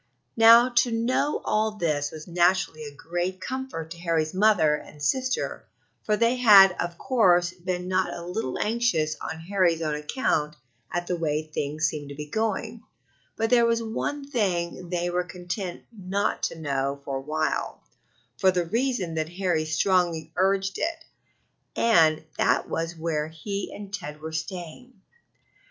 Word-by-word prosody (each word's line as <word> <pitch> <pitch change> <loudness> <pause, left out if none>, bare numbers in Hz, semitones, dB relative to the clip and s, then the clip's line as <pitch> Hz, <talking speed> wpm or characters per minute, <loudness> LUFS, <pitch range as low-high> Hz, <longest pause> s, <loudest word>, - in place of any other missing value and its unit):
Now, 230 +2 +8
to 245 - +5
know 235 +6 0
all 215 0 +1
this 150 -7 -1
was 155 0 -10
naturally 175 -2 +1
a 145 -1 -9
great 175 +4 -3
comfort 255 -9 -5
to 170 - -8
Harry's 165 -2 0
mother 185 -6 +4
and 150 0 -7
sister, 255 - -1 0.4
for 210 -1 +1
they 235 +3 +2
had 200 -6 +8
of 175 -1 -3
course 180 -9 +3
been 180 0 -4
not 185 0 +1
a 170 - -7
little 180 - -3
anxious 210 -9 0
on 160 - -5
Harry's 175 -2 +1
own 155 -1 -1
account 150 - -1 0.4
at 175 +1 -2
the 180 - -1
way 155 -2 -1
things 155 0 -2
seemed 150 -2 -3
to 140 - -8
be 150 +1 -6
going, 220 +7 -2 0.5
but 225 +1 -1
there 235 -1 +5
was 230 0 +1
one 275 +5 -3
thing 180 -8 -1
they 175 0 -1
were 180 0 0
content 180 +1 -6
not 195 0 -1
to - - -4
know 140 -2 -2
for 135 -1 -2
a - - -5
while 155 +2 -2 0.6
for 190 - +5
the 180 -2 +1
reason 230 -3 -1
that 160 0 -2
Harry 175 -3 -1
strongly 165 -1 +1
urged 195 +1 +1
it 325 0 -2 0.7
and 160 -9 +4 0.2
that - - +2
was 165 +1 -3
where 160 -2 -2
he 200 +5 -5
and 200 -1 -9
Ted 150 -7 -6
were 160 +1 -6
staying. 175 +8 -7
175 Hz, 160 wpm, -26 LUFS, 160-210 Hz, 0.7 s, Now